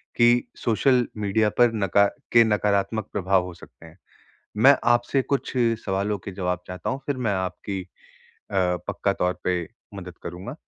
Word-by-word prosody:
कि 120 0 +3
social 125 +2 +2
media 105 +1 +1
पर 120 -1 +5
नका 100 -1 +3 0.3
के 115 -1 +7
नकारात्मक 105 0 0
प्रभाव 95 -2 +2
हो 90 - -8
सकते 85 - -16
हैं। 80 +3 -15 0.6
मैं 135 +5 +7 0.2
आपसे 120 +3 +2
कुछ 140 +1 -2 0.3
सवालों 100 +1 -1
के 100 - -8
जवाब 90 -1 -2
चाहता 90 -2 -5
हूँ, 135 +1 -2
फिर 140 -3 -2
मैं 115 -5 0
आपकी 95 +1 -4 0.7
अ, - - -7 0.3
पक्का - - -1
तौर 90 0 -1
पे 90 -1 0 0.3
मदद 90 -3 -9
करूँगा। 90 +9 -7
100 Hz, 155 wpm, -24 LUFS, 90-120 Hz, 0.7 s, के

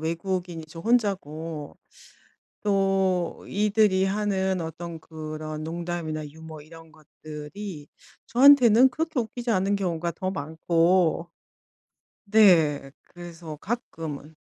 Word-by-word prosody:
외국인이 170 0 -3
저 165 +1 -10
혼자고 165 -9 -1 0.9
또 195 -3 +1
이들이 205 -2 +2
하는 190 -2 0
어떤 165 +1 -6
그런 155 -1 -7
농담이나 165 -2 -4
유머 160 0 -11
이런 165 +1 -14
것들이 155 +2 -9 0.4
저한테는 255 -2 +7
그렇게 310 0 -2
웃기지 235 +1 -4
않은 200 -1 +2
경우가 170 -3 -2
더 185 +1 -3
많고. 165 +2 +1 1.0
네 165 -10 +4
그래서 170 -2 -10
가끔은 160 - -6
175 Hz, 225 characters per minute, -26 LUFS, 160-200 Hz, 1.0 s, 저한테는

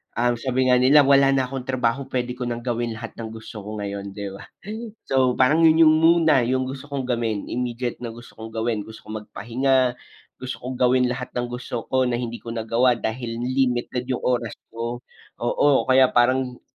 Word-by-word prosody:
Ah, 120 +1 +2
sabi 130 0 +1
nga 125 - +5
nila, 140 +3 +6
"Wala 135 0 +5
na 135 - +2
akong 130 0 -6
trabaho, 130 +1 0
pwede 125 -1 -2
ko 125 0 -4
nang 120 0 -4
gawin 120 -2 -2
lahat 115 +1 -7
ng 115 - -4
gusto 110 0 -9
ko 105 +1 -7
ngayon," 100 -1 -5
di 100 -1 -5
ba? 95 - -11 0.6
So, 130 -2 +3
parang 150 +7 +4
yun, 160 0 +6
yun - - +5
muna 160 -5 +4
yung 130 +1 0
gusto 135 +1 -7
kong 140 -3 -4
gawin, 115 -4 -1
immediate 120 0 -3
na 115 -2 -6
gusto 120 +1 -14
kong 110 0 -9
gawin, 110 -2 -2
gusto 110 0 -12
ko 110 - -4
magpahinga, 125 +3 0 0.4
gusto 130 0 -6
kong 125 +1 -5
gawin 125 0 +3
lahat 125 0 -5
ng 120 0 -2
gusto 120 -1 -6
ko 130 0 +2
na 125 - -1
hindi 120 -1 -4
ko 115 0 -8
nagawa 115 +2 +2
dahil 115 0 -4
limited 125 -1 0
yung 125 -1 -2
oras 120 -3 0 0.2
ko. 115 +1 -5 0.4
Oo, 135 +4 +3
kaya 130 0 +7
parang, 125 +1 +2
125 Hz, 195 wpm, -23 LUFS, 115-130 Hz, 0.6 s, kaya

